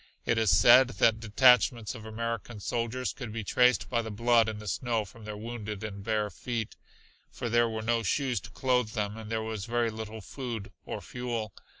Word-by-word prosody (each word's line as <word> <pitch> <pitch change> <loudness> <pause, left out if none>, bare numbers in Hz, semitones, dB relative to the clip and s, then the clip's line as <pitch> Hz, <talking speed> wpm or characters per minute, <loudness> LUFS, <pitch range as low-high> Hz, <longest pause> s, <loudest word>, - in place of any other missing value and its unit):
It 115 - +2
is 110 -2 +2
said 120 +9 +7
that 110 -1 +4
detachments 115 0 +4
of 110 -3 -9
American 115 0 -4
soldiers 115 +5 -2
could 125 -5 -7
be 110 0 -4
traced 125 +4 +3
by 120 -2 0
the 110 - -6
blood 115 +1 +3
in 110 - -5
the 105 0 -9
snow 115 +1 -1
from 110 +3 -14
their 105 -1 -6
wounded 110 -2 -6
and 100 -2 -6
bare 105 -1 0
feet, 115 +2 -4 0.5
for 120 - -5
there 120 0 +3
were 110 -1 -4
no 115 +1 +1
shoes 125 +1 0
to 90 +2 -12
clothe 125 -2 0
them 105 -2 -2
with 110 - -8
and 110 0 -9
there 110 -1 -1
was 110 -3 -4
very 120 -1 0
little 110 0 -7
food 115 -3 -6 0.2
or - - -4
fuel. 120 -5 -4
115 Hz, 205 wpm, -29 LUFS, 105-120 Hz, 0.5 s, said